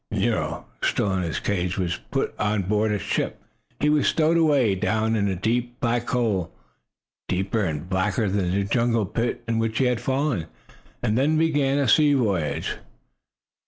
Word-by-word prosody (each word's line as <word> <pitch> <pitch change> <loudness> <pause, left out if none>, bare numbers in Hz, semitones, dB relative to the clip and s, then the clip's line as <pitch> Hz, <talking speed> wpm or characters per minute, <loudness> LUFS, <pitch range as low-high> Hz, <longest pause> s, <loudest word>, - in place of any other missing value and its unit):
Nero, - - -1 0.2
still 100 -2 +1
in 95 - 0
his 85 -3 -2
cage, 90 -3 -1
was 90 -2 -1
put - - -1
on 105 -1 +1
board 105 +3 +1
a 105 - +1
ship. - - -2 0.4
He 150 - +1
was 150 -2 +3
stowed 160 +1 +3
away 145 -10 +3
down 110 +4 0
in 100 -2 +1
a 95 - -1
deep, 120 +5 -1
black 120 0 0
hole, 110 -8 0 0.8
deeper 95 +4 0
and 80 -2 -3
blacker 95 +3 0
than 95 -2 0
the 100 +2 +1
jungle 115 +2 +1
pit 115 +6 -2
into 115 -1 0
which 115 0 -1
he 135 - +3
had 125 -2 +1
fallen, 130 - -1 0.6
and 110 +3 +1
then 155 +4 +2
began 145 -4 +2
a 140 -2 +1
sea 145 +3 +5
voyage. 100 - -1
110 Hz, 170 wpm, -24 LUFS, 95-125 Hz, 0.8 s, sea